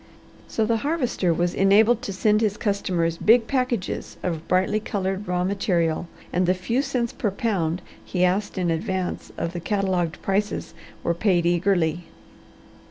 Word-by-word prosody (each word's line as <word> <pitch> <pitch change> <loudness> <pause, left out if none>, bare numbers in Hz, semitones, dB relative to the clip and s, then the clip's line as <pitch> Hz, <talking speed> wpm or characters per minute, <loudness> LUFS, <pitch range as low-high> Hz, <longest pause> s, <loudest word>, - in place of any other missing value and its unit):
So 220 - 0
the 230 +1 +1
Harvester 250 - 0
was 175 +1 0
enabled 215 +4 +4
to - - -4
send 210 +3 +2
his 210 -2 +1
customers 180 -5 0
big 230 +1 +5
packages 250 -7 -2
of 165 -3 -3
brightly 190 +3 +2
coloured 195 -1 -3
raw 180 0 0
material, 175 -4 0 0.3
and 180 0 +2
the 185 - +3
few 230 +8 0
cents 250 -4 -2
per 210 - -1
pound 185 -5 -1 0.2
he 180 -1 +1
asked 195 +3 0
in 175 -2 +1
advance 180 +3 -2
of 170 - -3
the 175 - -3
catalogued 185 -3 -1
prices 200 +2 -1 0.3
were 170 - +1
paid 175 -1 +2
eagerly. 175 -1 +1
190 Hz, 155 wpm, -24 LUFS, 175-215 Hz, 0.3 s, big